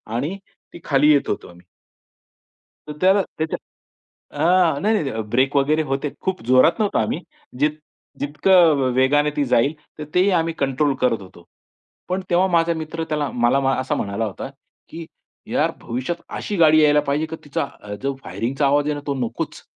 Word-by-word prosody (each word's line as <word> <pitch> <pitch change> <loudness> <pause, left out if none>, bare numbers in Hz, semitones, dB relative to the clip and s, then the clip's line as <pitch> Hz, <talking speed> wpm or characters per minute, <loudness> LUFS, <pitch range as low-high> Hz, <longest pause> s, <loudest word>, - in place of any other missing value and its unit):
आणि 150 +11 -2 0.4
ती - - -10
खाली 150 +1 +4
येत 145 - +3
होतो - - -3
आम्ही. 90 +1 -17 1.2
तर 150 - -4
त्याला 190 +2 +4 0.2
त्याच्या 160 0 -1 0.9
आ, 175 -3 +3
नाही, 215 +2 +2
नाही, 205 - 0
नाही. 110 0 -3
ब्रेक 135 +3 +2
वगैरे 150 +3 +2
होते. 135 0 -2
खूप 190 -7 -3
जोरात 130 - +4
नव्हतो 205 - +1
आम्ही. 165 - -1 0.4
जित 150 +1 +3 0.5
जितकं 155 +1 +4
वेगाने 145 +3 +3
ती 145 - +1
जाईल, 135 +3 +2 0.2
तर 150 - -5
तेही 185 +3 +4
आम्ही 165 0 -2
कंट्रोल 140 +1 +1
करत 125 -4 +1
होतो. 90 -2 -15 0.6
पण 185 +1 -1
तेव्हा 180 +2 +3
माझा 170 -1 +2
मित्र 160 +1 -5
त्याला 150 -3 -1
मला 120 +3 +2
मा 135 0 +1
असा 130 - -2
म्हणाला 100 +3 -2
होता, 105 +5 -6 0.4
की 165 0 -8 0.5
"यार - - +1
भविष्यात 130 +9 -4
अशी 205 - -4
गाडी 155 -2 +5
यायला 150 0 +5
पाहिजे, 150 +3 0
की 160 +1 -7
तिचा 145 - -2 0.4
जो 140 0 -1
फायरिंगचा 135 +5 -2
आवाज 145 +1 +3
आहे 150 - 0
ना 145 - -5
तो 140 - -1
नकोच." - - -6
150 Hz, 175 wpm, -21 LUFS, 135-165 Hz, 1.2 s, गाडी